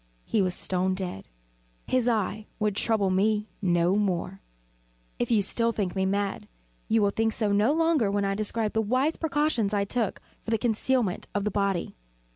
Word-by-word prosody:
He 215 Hz, -, +1 dB
was 185 Hz, -1 st, +1 dB
stone 185 Hz, 0 st, +1 dB
dead. 180 Hz, -, -6 dB, 0.6 s
His 255 Hz, -2 st, +1 dB
eve 215 Hz, -2 st, 0 dB
would 210 Hz, -2 st, 0 dB
trouble 205 Hz, -3 st, +1 dB
me 210 Hz, +3 st, +1 dB
no 175 Hz, -1 st, +2 dB
more. 195 Hz, -2 st, -1 dB, 0.8 s
If 240 Hz, -, 0 dB, 0.2 s
still 230 Hz, +3 st, +1 dB
you 230 Hz, -, +1 dB
think 190 Hz, -5 st, -2 dB
me 190 Hz, 0 st, +1 dB
mad, 200 Hz, 0 st, -2 dB, 0.4 s
you 220 Hz, -1 st, +3 dB
will 200 Hz, -, +3 dB
think 225 Hz, +1 st, 0 dB
so 210 Hz, -2 st, 0 dB
no 205 Hz, +6 st, +3 dB
longer 325 Hz, -9 st, +2 dB
when 200 Hz, 0 st, 0 dB
I 195 Hz, -, 0 dB
describe 215 Hz, +1 st, -1 dB
the 220 Hz, -, +2 dB
wise 255 Hz, +8 st, +1 dB
precautions 295 Hz, -10 st, 0 dB
I 200 Hz, -1 st, +1 dB
took 225 Hz, 0 st, -2 dB, 0.2 s
for -, -, -7 dB
the 225 Hz, -, +2 dB
concealment 230 Hz, -2 st, 0 dB
of 205 Hz, -, 0 dB
the 210 Hz, -, -1 dB
body. 195 Hz, -3 st, -1 dB
210 Hz, 180 wpm, -27 LUFS, 195-225 Hz, 0.8 s, you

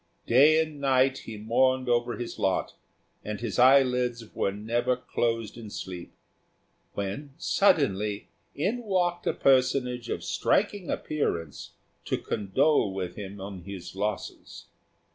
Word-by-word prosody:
Day 145 Hz, +6 st, +6 dB
and 155 Hz, -2 st, -2 dB
night 130 Hz, -1 st, +3 dB
he 110 Hz, -, -7 dB
mourned 130 Hz, +4 st, +2 dB
over 120 Hz, -1 st, +1 dB
his 120 Hz, 0 st, -6 dB
lot, 95 Hz, -, 0 dB, 0.5 s
and 105 Hz, 0 st, -5 dB
his 115 Hz, -1 st, -3 dB
eyelids 125 Hz, -3 st, +3 dB
were 100 Hz, -, 0 dB
never 115 Hz, +5 st, 0 dB
closed 115 Hz, -3 st, -2 dB
in 110 Hz, -2 st, -8 dB
sleep, 90 Hz, -3 st, -7 dB, 0.8 s
when 130 Hz, +9 st, -5 dB
suddenly 105 Hz, -, +2 dB, 0.3 s
in 200 Hz, +12 st, -1 dB
walked 180 Hz, -5 st, 0 dB
a -, -, +2 dB
personage 130 Hz, -2 st, +2 dB
of -, -, -3 dB
striking 190 Hz, -, 0 dB
appearance 85 Hz, -, -3 dB, 0.3 s
to -, -, 0 dB
condole 105 Hz, +4 st, +1 dB
with 90 Hz, -2 st, -4 dB
him 100 Hz, -1 st, -8 dB
on 95 Hz, 0 st, -7 dB
his 90 Hz, -1 st, -8 dB
losses. 105 Hz, +1 st, -4 dB
120 Hz, 125 wpm, -27 LUFS, 100-135 Hz, 0.8 s, Day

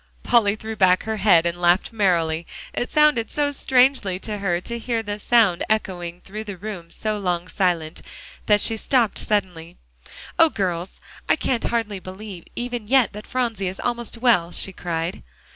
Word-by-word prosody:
Polly 215 Hz, -4 st, +3 dB
threw 220 Hz, +1 st, -6 dB
back 185 Hz, -3 st, +4 dB
her 220 Hz, 0 st, -3 dB
head 185 Hz, -5 st, +5 dB
and 170 Hz, +1 st, -2 dB
laughed 175 Hz, +6 st, +3 dB
merrily. 170 Hz, -6 st, +1 dB, 0.3 s
It 245 Hz, -, -3 dB
sounded 300 Hz, -7 st, +3 dB
so 290 Hz, -1 st, 0 dB
strangely 255 Hz, -8 st, +2 dB
to 210 Hz, -2 st, -4 dB
her 175 Hz, -3 st, 0 dB
to 235 Hz, +4 st, -5 dB
hear 230 Hz, -1 st, -2 dB
the 205 Hz, 0 st, -4 dB
sound 210 Hz, -6 st, +3 dB
echoing 180 Hz, -5 st, -2 dB
through 215 Hz, +3 st, -7 dB
the 200 Hz, -3 st, -6 dB
room 185 Hz, -3 st, -7 dB
so 215 Hz, +3 st, -2 dB
long 180 Hz, -2 st, -1 dB
silent, 175 Hz, -5 st, -1 dB, 0.5 s
that 210 Hz, -1 st, +4 dB
she 225 Hz, -, -1 dB
stopped 235 Hz, -1 st, +1 dB
suddenly. 180 Hz, -5 st, -2 dB, 0.6 s
"Oh, 330 Hz, -, +7 dB
girls! 185 Hz, -, -3 dB, 0.3 s
I -, -, +5 dB
can't 245 Hz, -3 st, -1 dB
hardly 220 Hz, -4 st, -1 dB
believe 185 Hz, -1 st, -9 dB
even 240 Hz, -3 st, -4 dB
yet 260 Hz, -2 st, +3 dB
that 210 Hz, +1 st, -9 dB
Phronsie 230 Hz, -6 st, -1 dB
is 185 Hz, +1 st, -5 dB
almost 240 Hz, -1 st, -3 dB
well," 230 Hz, -8 st, +3 dB
she 190 Hz, -, -3 dB
cried. 170 Hz, -1 st, -3 dB
205 Hz, 170 wpm, -23 LUFS, 180-230 Hz, 0.6 s, Oh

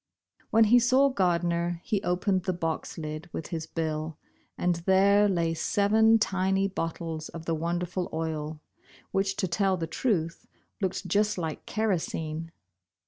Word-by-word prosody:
When 225 Hz, -, +5 dB
he 235 Hz, +3 st, +6 dB
saw 260 Hz, +4 st, +4 dB
Gardner, 175 Hz, -5 st, 0 dB
he 205 Hz, -2 st, -1 dB
opened 185 Hz, +1 st, 0 dB
the 185 Hz, -, +1 dB
box 165 Hz, -2 st, -3 dB
lid 155 Hz, +1 st, -6 dB
with 160 Hz, -, -5 dB
his 160 Hz, -2 st, -4 dB
bill, 155 Hz, -1 st, -3 dB, 0.4 s
and 175 Hz, -1 st, +1 dB
there 200 Hz, +2 st, +5 dB
lay 170 Hz, -3 st, +1 dB
seven 220 Hz, +6 st, +3 dB
tiny 195 Hz, -2 st, +1 dB
bottles 165 Hz, -3 st, -4 dB
of 165 Hz, -1 st, -9 dB
the 165 Hz, -, 0 dB
wonderful 175 Hz, +2 st, -2 dB
oil, 155 Hz, -1 st, -3 dB, 0.5 s
which 195 Hz, 0 st, 0 dB
to 190 Hz, -, -1 dB
tell 190 Hz, +2 st, +1 dB
the 165 Hz, -, -2 dB
truth, 165 Hz, -1 st, -1 dB, 0.3 s
looked 190 Hz, 0 st, -2 dB
just 210 Hz, +3 st, +1 dB
like 160 Hz, -3 st, -4 dB
kerosene. 165 Hz, -6 st, -2 dB
175 Hz, 140 wpm, -28 LUFS, 165-200 Hz, 0.5 s, he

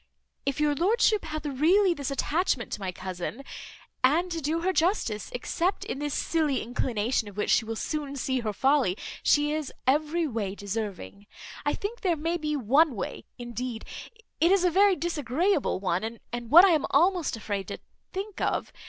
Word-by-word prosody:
If 275 Hz, +1 st, 0 dB
your 300 Hz, -1 st, +3 dB
lordship 415 Hz, -, +2 dB
hath 310 Hz, -1 st, -5 dB
really 340 Hz, +8 st, +3 dB
this 285 Hz, -4 st, -4 dB
attachment 280 Hz, -2 st, 0 dB
to -, -, -3 dB
my 190 Hz, -2 st, -3 dB
cousin 185 Hz, +7 st, -6 dB, 0.6 s
(and 330 Hz, +8 st, +3 dB
to 330 Hz, -1 st, -3 dB
do 315 Hz, +3 st, -1 dB
her 375 Hz, +2 st, +1 dB
justice, 320 Hz, -, 0 dB
except 340 Hz, +9 st, -1 dB
in -, -, -4 dB
this 295 Hz, -1 st, -2 dB
silly 310 Hz, -5 st, 0 dB
inclination, 230 Hz, -1 st, -1 dB
of 205 Hz, -1 st, -11 dB
which 210 Hz, -, 0 dB
she 225 Hz, -, +3 dB
will 225 Hz, +1 st, -4 dB
soon 290 Hz, +3 st, -3 dB
see 260 Hz, -1 st, -1 dB
her 220 Hz, -3 st, -2 dB
folly, 260 Hz, -3 st, +2 dB, 0.2 s
she 295 Hz, 0 st, +3 dB
is 310 Hz, -3 st, -3 dB
every 305 Hz, +5 st, +2 dB
way 210 Hz, -6 st, -3 dB
deserving), 205 Hz, -, -5 dB, 0.4 s
I -, -, +2 dB
think 450 Hz, +4 st, -5 dB
there 360 Hz, -5 st, +2 dB
may 330 Hz, +3 st, -1 dB
be 300 Hz, -2 st, -2 dB
one 275 Hz, +3 st, +3 dB
way, 195 Hz, -, -5 dB
indeed, 240 Hz, -1 st, -5 dB, 0.5 s
it 335 Hz, +3 st, +4 dB
is 390 Hz, -2 st, +4 dB
a 360 Hz, -, +3 dB
very 395 Hz, +2 st, +5 dB
disagreeable 330 Hz, -, 0 dB
one, 195 Hz, +5 st, -2 dB, 0.2 s
and 240 Hz, -1 st, -5 dB
what 345 Hz, +6 st, +9 dB
I -, -, +5 dB
am 310 Hz, -4 st, +2 dB
almost 340 Hz, -2 st, +2 dB
afraid 205 Hz, -3 st, -4 dB
to -, -, -5 dB, 0.3 s
think 390 Hz, +1 st, -5 dB
of. -, -, -1 dB
285 Hz, 180 wpm, -27 LUFS, 230-335 Hz, 0.6 s, what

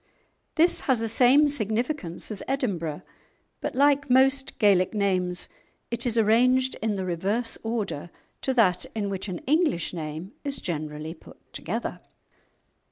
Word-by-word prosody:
This 335 Hz, +2 st, +4 dB
has 255 Hz, -3 st, +4 dB
the 225 Hz, -, -1 dB
same 255 Hz, +6 st, +5 dB
signification 225 Hz, -, -2 dB
as 205 Hz, +2 st, -7 dB
Edinburgh, 190 Hz, -, -2 dB, 0.6 s
but, -, -, -4 dB
like 285 Hz, +1 st, +3 dB
most 265 Hz, +2 st, +3 dB
Gaelic 200 Hz, -2 st, +3 dB
names, 185 Hz, -3 st, 0 dB, 0.4 s
it 235 Hz, +1 st, 0 dB
is 235 Hz, -1 st, 0 dB
arranged 250 Hz, +4 st, +3 dB
in 220 Hz, -2 st, 0 dB
the 190 Hz, -1 st, -3 dB
reverse 195 Hz, +7 st, -1 dB
order 215 Hz, -8 st, -3 dB, 0.3 s
to 265 Hz, -, 0 dB
that 185 Hz, -7 st, +3 dB
in 205 Hz, -2 st, -2 dB
which 195 Hz, +1 st, -4 dB
an 180 Hz, -3 st, -5 dB
English 300 Hz, -, +1 dB
name 160 Hz, +2 st, -6 dB
is 280 Hz, -1 st, -2 dB
generally 155 Hz, -1 st, -4 dB
put -, -, -16 dB, 0.2 s
together. -, -, -4 dB
220 Hz, 140 wpm, -26 LUFS, 180-260 Hz, 0.6 s, same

